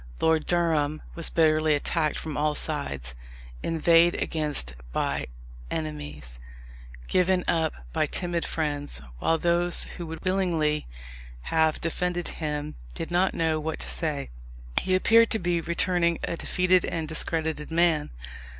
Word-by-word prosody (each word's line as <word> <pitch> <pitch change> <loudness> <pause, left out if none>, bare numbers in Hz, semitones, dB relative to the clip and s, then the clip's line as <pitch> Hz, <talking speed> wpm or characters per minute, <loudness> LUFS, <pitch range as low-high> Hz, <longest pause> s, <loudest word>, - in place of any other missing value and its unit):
Lord 160 -1 +2
Durham 155 -4 +1
was 170 - -1
bitterly 155 -1 +3
attacked 155 +1 0
from 155 -2 -5
all 150 0 +1
sides, 70 - -3 0.5
inveighed 165 +1 +4
against 150 - +2 0.2
by - - -1 0.4
enemies, 145 - -5 0.7
given 185 0 +2
up 160 -2 +2 0.2
by - - +1
timid 175 -2 -1
friends; 145 -2 -2 0.2
while 165 - +2
those 175 +1 +3
who 175 - -6
would 165 +3 -8
willingly 170 -5 +1 0.7
have 160 -1 +3
defended 175 +1 -1
him 150 -1 -4 0.2
did 165 - -5
not 180 +2 +2
know 160 -1 +1
what 160 +1 -3
to - - -6
say. 150 - -2 0.5
He 185 - +1
appeared 230 +4 +5
to - - +2
be 175 -3 0
returning 170 0 +2
a - - -2
defeated 180 +1 +2
and 160 -2 -2
discredited 160 -1 -2
man. 165 -2 +2
160 Hz, 130 wpm, -26 LUFS, 150-175 Hz, 0.7 s, appeared